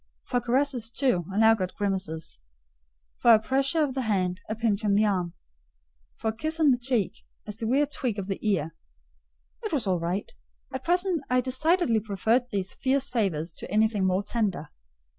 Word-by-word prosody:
For 245 - 0
caresses, 245 -1 0
too, 235 - +1
I 195 - -4
now 225 +1 +6
got 185 -4 -3
grimaces; 185 - -3 0.8
for 235 -1 +7
a - - +3
pressure 275 +7 +1
of 280 -3 -1
the 265 - -1
hand, 190 -4 0
a 215 - -1
pinch 220 -2 0
on 205 -2 +2
the 215 +1 +4
arm; 180 -4 -1 0.8
for 220 - -2
a - - -14
kiss 315 +7 -2
on 300 -3 +5
the 245 - +2
cheek, 240 -8 -1 0.3
a 215 - -5
severe 235 +7 +1
tweak 255 -6 -3
of 200 - -3
the 195 0 -3
ear. 170 -7 0 0.9
It 435 - -4
was 280 -8 0
all 185 -3 +1
right: 175 +4 -3 0.4
at 260 0 -4
present 355 -1 +1
I 250 0 +3
decidedly 260 0 +2
preferred 220 +4 0
these 195 -3 -2
fierce 275 +1 0
favours 180 -9 -1
to - - -10
anything 215 -1 +2
more 185 +2 +1
tender. 200 -9 -2
220 Hz, 180 wpm, -27 LUFS, 195-260 Hz, 0.9 s, for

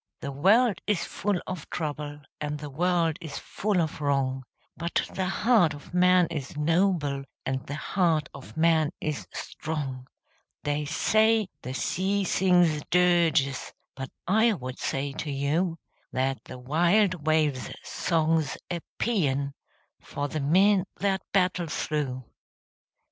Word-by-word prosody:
The 140 - -4
world 195 - +4
is 210 -5 +1
full 200 -2 -1
of 180 -5 -6
trouble, 150 -2 -4 0.2
And 150 0 -3
the 150 -1 -7
world 170 +1 +1
is 155 -4 -6
full 205 -2 -1
of 160 -3 -2
wrong, 135 -2 0 0.3
But 170 +1 -1
the 190 -1 -1
heart 195 -5 +3
of 145 - -13
man 180 0 +5
is 145 -3 -5
noble, 155 -3 +1 0.2
And 130 0 -2
the 145 - -4
heart 165 -1 +1
of 140 +3 -11
man 160 -2 +4
is 150 -1 -3
strong! 135 -5 -5 0.6
They 145 0 -1
say 215 +6 +3
the 130 +1 -5
sea 195 +7 0
sings 175 -4 +3
dirges, 170 -6 +3 0.2
But 135 -1 -6 0.2
I 220 +5 +4
would 130 -7 -6
say 140 +1 -2
to 150 - -4
you 155 +5 0 0.3
That 130 +1 -1
the - - -8
wild 170 +5 +2
wave's 155 -4 +2
song's 160 -3 0
a 175 - -1 0.2
paean 140 - 0 0.5
For 145 0 -4
the 155 - -3
men 190 +6 +4
that 195 -2 0
battle 180 -3 +2
through. 140 -5 -2
160 Hz, 135 wpm, -27 LUFS, 145-185 Hz, 0.6 s, man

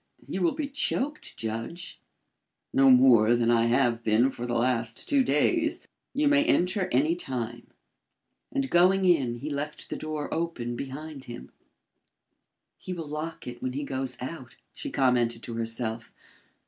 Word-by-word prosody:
You 190 - -3
will 175 - +3
be 300 -1 -2
choked, 285 +1 -2
Judge." 115 +10 -5 0.7
"No 135 0 +6
more 125 -3 +6
than 120 0 +2
I 115 -1 +4
have 120 -1 +2
been 115 +5 +3
for 120 -1 -6
the 120 - -2
last 115 -2 0
two 280 -2 +3
days. 315 - +1 0.3
You 290 +2 +1
may 290 0 +5
enter 185 - +2
any 150 +6 +3
time." 120 -7 -5 0.8
And 275 -2 -2
going 185 +2 +4
in, 140 -10 +3
he 140 +6 -6
left 145 +1 -5
the - - -1
door 155 -1 -4
open 160 -8 -2
behind 140 +2 -7
him. 120 0 -9 1.3
"He 185 - -6
will 165 -3 -5
lock 150 +2 -5
it 120 -1 -8
when 130 - -2
he 145 +2 -3
goes 130 -2 -4
out," 130 -1 -7 0.2
she - - -6
commented 120 -3 +1
to 120 - -6
herself. 115 0 -3
135 Hz, 155 wpm, -27 LUFS, 120-170 Hz, 1.3 s, No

